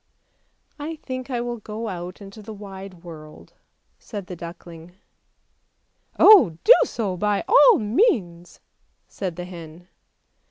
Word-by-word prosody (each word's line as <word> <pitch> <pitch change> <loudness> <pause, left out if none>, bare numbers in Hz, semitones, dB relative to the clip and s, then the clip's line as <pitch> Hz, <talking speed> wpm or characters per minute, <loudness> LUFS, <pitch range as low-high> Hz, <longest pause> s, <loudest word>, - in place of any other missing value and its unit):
" - - -44
I 325 - -5
think 255 -4 -7
I 245 -2 -2
will 240 0 -4
go 215 +2 -6
out 180 0 -7
into 200 +2 -12
the 215 +1 -9
wide 195 -3 -11
world," 155 -3 -12 0.5
said 205 -4 -8
the 180 - -8
duckling. 170 0 -11 0.6
" - - -42
Oh, 355 - +7
do - - +9
so 205 - -3
by 205 +2 -1
all 480 +1 +6
means," 210 - -1 0.5
said 185 -4 -5
the 180 +1 -6
hen. 175 0 -12
195 Hz, 135 wpm, -23 LUFS, 175-230 Hz, 0.6 s, do